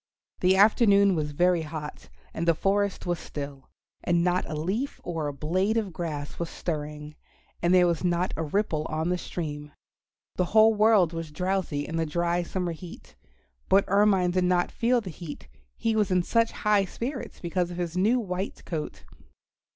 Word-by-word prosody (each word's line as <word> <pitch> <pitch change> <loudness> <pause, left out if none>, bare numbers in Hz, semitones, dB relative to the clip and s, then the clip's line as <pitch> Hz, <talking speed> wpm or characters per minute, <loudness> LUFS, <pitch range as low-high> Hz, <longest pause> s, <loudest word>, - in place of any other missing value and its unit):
The 185 +1 +4
afternoon 200 -1 +5
was 155 -3 -1
very 175 +3 +2
hot, 155 -1 -7 0.2
and 170 - -3
the 170 - +4
forest 200 +2 0
was 175 -2 -1
still, 140 -2 -7 0.3
and 170 -1 +2
not 180 +1 0
a 155 - -3
leaf 195 - -2
or 165 -3 -3
a - - -2
blade 185 +10 0
of 205 -6 -2
grass 150 -4 -5
was 170 -1 -3
stirring, 150 -2 -5 0.5
and 170 - +2
there 180 -1 +6
was 170 -1 0
not 180 +1 0
a - - -3
ripple 160 -1 -1
on 160 +2 -1
the 180 - +1
stream. 150 -4 -5 0.7
The 180 - +2
whole 220 +1 +7
world 210 -5 +4
was 165 -1 -5
drowsy 180 -3 -2
in 165 - -3
the 165 -1 0
dry 170 +2 0
summer 175 0 -3
heat. 170 +1 -11 0.5
But 195 +1 +5
Ermine 195 -2 +3
did 180 0 +1
not 180 -1 +1
feel 240 +1 +1
the 190 -4 -7
heat, 150 - -9 0.3
he 225 -1 0
was 210 -3 +2
in 180 -1 +2
such 230 +4 +2
high 210 -2 +2
spirits 250 +7 -6
because 175 0 -1
of 175 - -7
his 175 -1 -3
new 215 +7 +3
white 190 -3 -4
coat. 155 -3 -5
175 Hz, 180 wpm, -27 LUFS, 160-195 Hz, 0.7 s, whole